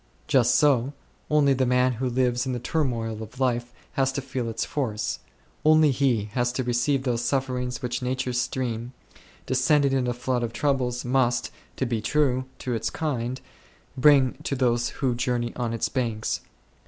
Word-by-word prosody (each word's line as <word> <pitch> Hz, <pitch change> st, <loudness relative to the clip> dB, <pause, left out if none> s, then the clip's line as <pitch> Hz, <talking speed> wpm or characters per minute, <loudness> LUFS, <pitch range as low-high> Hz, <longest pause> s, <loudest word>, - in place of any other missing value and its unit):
Just 125 Hz, -4 st, +3 dB
so, 140 Hz, -2 st, +3 dB, 0.4 s
only 145 Hz, -2 st, +4 dB
the 130 Hz, 0 st, +1 dB
man 125 Hz, +1 st, +3 dB
who 125 Hz, +2 st, -2 dB
lives 125 Hz, 0 st, +1 dB
in 130 Hz, -, -1 dB
the 125 Hz, -, -2 dB
turmoil 115 Hz, -6 st, -1 dB
of 110 Hz, +4 st, -10 dB
life 120 Hz, -2 st, 0 dB, 0.2 s
has 135 Hz, -2 st, +1 dB
to 140 Hz, -, -2 dB
feel 130 Hz, -3 st, -3 dB
its 115 Hz, 0 st, -2 dB
force; 125 Hz, -9 st, -2 dB, 0.4 s
only 155 Hz, -1 st, +6 dB
he 120 Hz, -6 st, +1 dB
has 120 Hz, -1 st, +1 dB
to 130 Hz, -, -1 dB
receive 125 Hz, +3 st, +1 dB
those 120 Hz, -3 st, 0 dB
sufferings 125 Hz, -1 st, -1 dB
which 125 Hz, 0 st, -2 dB
nature's 125 Hz, -1 st, -1 dB
stream, 125 Hz, -1 st, -3 dB, 0.5 s
descending 140 Hz, +2 st, +3 dB
in 130 Hz, -2 st, +1 dB
a 120 Hz, -, 0 dB
flood 125 Hz, 0 st, -1 dB
of 115 Hz, -1 st, -3 dB
troubles, 125 Hz, -4 st, 0 dB
must, 125 Hz, -2 st, +1 dB, 0.2 s
to 130 Hz, -, -1 dB
be 115 Hz, -3 st, -1 dB
true 130 Hz, 0 st, +1 dB
to 125 Hz, -, -3 dB
its 115 Hz, -, -1 dB
kind, 130 Hz, -5 st, -3 dB, 0.5 s
bring 135 Hz, -1 st, +5 dB
to 140 Hz, -, -2 dB
those 120 Hz, -2 st, +1 dB
who 130 Hz, -3 st, -1 dB
journey 120 Hz, -1 st, -1 dB
on 120 Hz, -2 st, -2 dB
its 115 Hz, -2 st, -1 dB
banks. 115 Hz, -4 st, -2 dB
125 Hz, 170 wpm, -25 LUFS, 120-135 Hz, 0.5 s, only